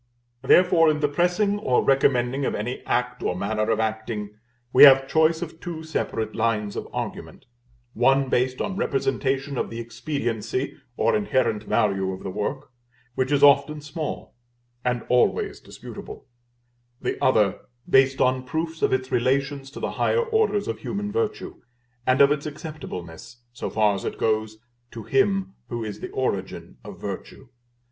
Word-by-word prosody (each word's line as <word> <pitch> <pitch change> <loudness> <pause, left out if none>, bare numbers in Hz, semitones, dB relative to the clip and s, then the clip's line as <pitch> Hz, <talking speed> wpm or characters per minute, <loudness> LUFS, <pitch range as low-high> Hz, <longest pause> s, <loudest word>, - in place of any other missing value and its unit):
Therefore, 165 +3 +5
in 150 -1 +1
the 150 - +2
pressing 180 +7 +1
or 130 -11 +2
recommending 135 -1 +2
of - - -1
any 120 +5 -4
act 125 0 -1
or 90 - -1
manner 105 +3 -1
of 110 -1 +1
acting, 110 -1 -3 0.4
we - - +5
have 135 -1 +9
choice 160 +3 +2
of 160 -1 -9
two 165 -2 -6
separate 115 -8 -3
lines 105 -2 0
of - - -5
argument: - - -6 0.5
one 135 +3 +3
based 130 0 0
on 195 - -2
representation 135 - -1
of - - -2
the 115 - -6
expediency 115 0 -3 0.2
or - - +2
inherent 130 - +1
value 95 -3 +1
of 95 - -9
the 95 - -4
work, 130 +8 -4 0.4
which 130 +2 -1
is 145 -1 +2
often 145 +1 +5
small, 150 +1 -6 0.5
and 125 -1 -1
always 125 0 +1
disputable; - - -10 0.7
the - - -3
other 105 -7 +3 0.3
based 135 0 +4
on 130 0 +2
proofs 160 +5 -4
of - - +2
its 130 0 -1
relations 135 +2 0
to 140 - -9
the - - -2
higher 470 0 +1
orders 440 - +1
of - - -3
human 205 +2 -4
virtue, 430 - -3 0.5
and 130 +1 +4
of 140 0 +7
its 150 0 -1
acceptableness, 125 - -8
so - - -4
far 105 -2 +2
as 95 - -5
it - - -4
goes, 110 0 0 0.3
to 115 -1 -9
Him 195 - +1 0.2
who 120 -1 -3
is 105 -2 -6
the - - -6
origin 100 -8 -3
of - - -10
virtue. 135 - -7
135 Hz, 160 wpm, -24 LUFS, 115-155 Hz, 0.7 s, have